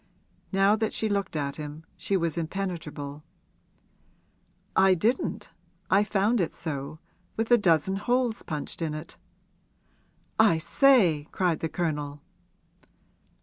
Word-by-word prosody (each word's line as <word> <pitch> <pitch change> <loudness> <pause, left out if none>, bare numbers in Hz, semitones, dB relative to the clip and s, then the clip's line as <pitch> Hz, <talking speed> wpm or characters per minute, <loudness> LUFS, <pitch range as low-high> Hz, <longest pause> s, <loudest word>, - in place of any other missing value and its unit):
Now 195 +1 +4
that 220 0 -1
she 220 - 0
looked 200 -4 -2
at 140 -2 -2
him 150 +1 -7
she 195 - -1
was 165 -3 -1
impenetrable. 160 -5 -4 1.5
'I 190 -1 +5
didn't 225 +9 -1 0.4
I 195 +2 +5
found 210 +2 +1
it 170 - -2
so 145 -2 -5 0.4
with 225 +2 -1
a 240 - +8
dozen 185 0 +2
holes 240 +1 0
punched 150 +1 -5
in 155 -2 -2
it!' 155 +2 -8 1.2
'I 215 -7 +5
say!' 175 - +4
cried 175 -4 0
the 160 - -2
Colonel. 150 -5 -3
175 Hz, 120 wpm, -27 LUFS, 155-205 Hz, 1.5 s, a